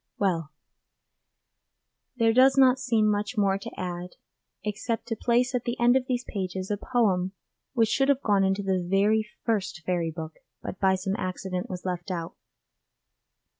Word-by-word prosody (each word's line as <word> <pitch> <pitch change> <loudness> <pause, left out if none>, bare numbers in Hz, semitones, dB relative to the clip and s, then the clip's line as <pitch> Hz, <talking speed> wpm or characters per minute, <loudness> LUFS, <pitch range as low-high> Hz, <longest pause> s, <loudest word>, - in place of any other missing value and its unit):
Well, 170 -6 0 1.7
there 225 -2 +3
does 265 +3 +5
not 260 -1 +6
seem 230 -4 +2
much 210 +2 0
more 195 -1 +2
to - - -9
add 180 0 -5 0.5
except 215 +2 -3
to 225 - -1
place 245 +2 +1
at 245 -1 -1
the 240 -1 -2
end 240 +1 +5
of 260 -1 +1
these 250 -1 -1
pages 190 -1 -4
a - - +2
poem 195 -6 +1 0.4
which 225 -4 +3
should 270 +3 +2
have 280 -1 +2
gone 200 -2 +3
into 195 +1 +1
the 190 -1 +1
very 210 +4 +2 0.2
first 200 -7 -1
Fairy 175 -2 0
Book, 160 -1 -7 0.2
but 185 - -7
by 190 -1 +4
some 190 +1 -2
accident 185 0 -3
was 180 0 -6
left 180 +1 -3
out. 170 -3 -4
200 Hz, 165 wpm, -27 LUFS, 185-235 Hz, 1.7 s, not